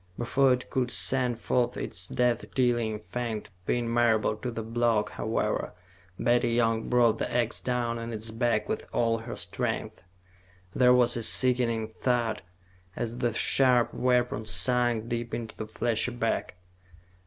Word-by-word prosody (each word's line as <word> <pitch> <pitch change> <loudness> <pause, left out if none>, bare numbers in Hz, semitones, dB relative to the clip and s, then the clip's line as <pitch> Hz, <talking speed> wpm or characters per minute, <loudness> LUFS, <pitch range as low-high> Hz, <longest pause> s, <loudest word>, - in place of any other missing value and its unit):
Before 135 +3 +2
it 125 0 -2
could 125 -2 0
send 120 +4 +1
forth 125 0 0
its 95 -1 -3
death 120 -1 0
dealing 120 -4 0
fang 115 -1 -4
to - - -19 0.2
pin 120 -1 0
Marable 115 -2 +2
to 125 - -4
the 115 -1 -5
block, 115 -1 0
however, - - -2 0.4
Betty 120 0 +2
Young 115 -1 0
brought 120 -3 +3
the - - -2
ax 120 -1 0
down 120 -2 -2
on 115 0 -6
its 110 0 -4
back 120 +1 0
with - - -4
all 115 -1 +1
her 115 +2 -7
strength. - - -3 0.7
There 125 -1 +4
was 125 -1 +4
a - - -2
sickening 115 -2 +3
thud 120 -3 0 0.5
as 120 +1 -4
the 120 -3 -1
sharp 125 -3 +3
weapon 125 -3 0
sunk 115 +4 +3
deep 120 0 -3
into 115 -2 -6
the 110 - -6
fleshy 115 +2 0
back. 115 -5 -2
120 Hz, 155 wpm, -27 LUFS, 115-125 Hz, 0.7 s, There